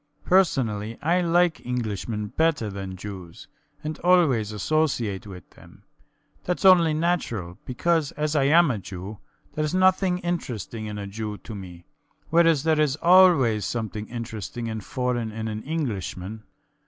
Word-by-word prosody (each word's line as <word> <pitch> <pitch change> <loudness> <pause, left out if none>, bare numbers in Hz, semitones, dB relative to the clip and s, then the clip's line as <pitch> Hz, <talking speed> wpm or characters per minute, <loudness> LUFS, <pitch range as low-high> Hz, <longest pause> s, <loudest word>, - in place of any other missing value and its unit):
Personally, 115 - +1
I 175 +4 +2
like 175 0 +2
Englishmen 110 -3 -3
better 155 -9 0
than 95 -1 -6
Jews, 95 -3 -9 0.4
and 155 0 -5
always 155 - +3
associate 110 -4 -1
with 90 -4 -10
them. - - -18 0.6
Thats 180 +2 -2
only 170 -4 +6
natural, 120 - -2
because, 160 +3 0
as 150 +1 -2
I 140 -2 +3
am 165 +1 +5
a 110 - -3
Jew, 95 +2 -8 0.3
theres 155 +2 -1
nothing 185 -1 +3
interesting 120 - -4
in 105 0 -5
a 100 - -5
Jew 105 +1 -5
to 105 +5 -10
me, 90 -4 -10 0.5
whereas 165 -3 +4
there 160 -1 +2
is 145 -3 +2
always 165 - +5
something 110 0 -4
interesting 115 -1 -6
and 110 -2 -5
foreign 125 -2 -2
in 110 +1 -5
an 110 0 -4
Englishman. 110 - -4
120 Hz, 140 wpm, -25 LUFS, 105-165 Hz, 0.6 s, only